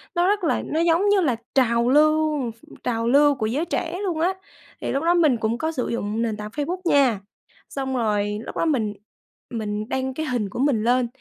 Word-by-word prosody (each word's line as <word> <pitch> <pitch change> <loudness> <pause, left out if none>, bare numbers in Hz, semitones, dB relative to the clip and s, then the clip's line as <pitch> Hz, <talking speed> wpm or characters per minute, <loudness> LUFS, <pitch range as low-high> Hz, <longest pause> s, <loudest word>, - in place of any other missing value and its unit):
Nó 350 +1 +3
rất 410 0 +1
là 325 - +1
nó 315 - -2
giống 340 +4 +3
như 405 -1 +4
là 270 -9 +1 0.2
trào 235 -2 +3
lưu 305 -2 +3
ph 225 +1 -22 0.2
trào 230 -1 -1
lưu 285 +3 +5
của 235 -5 -2
giới 270 +10 -1
trẻ 345 0 -3
luôn 345 -5 -2
á 360 +3 +2 0.5
thì - - -2
lúc 275 +3 -1
đó 340 - +4
mình 310 -8 +3
cũng 225 +1 -1
có 315 +5 -2
sử 255 -6 -3
dụng 220 -1 -2
nền 220 -2 -1
tảng 210 0 -6
Facebook 300 +9 -3
nha. 270 - +3 0.5
Xong 265 -1 -3
rồi 210 -2 0
lúc - - -7
đó - - +1
mình 235 -10 0 0.6
mình 215 -1 -4
đăng 265 0 -2
cái 315 +4 -3
hình 245 -8 -1
của 195 - -7
mình 260 -5 +2
lên 245 +1 +2
265 Hz, 220 wpm, -23 LUFS, 230-315 Hz, 0.6 s, lưu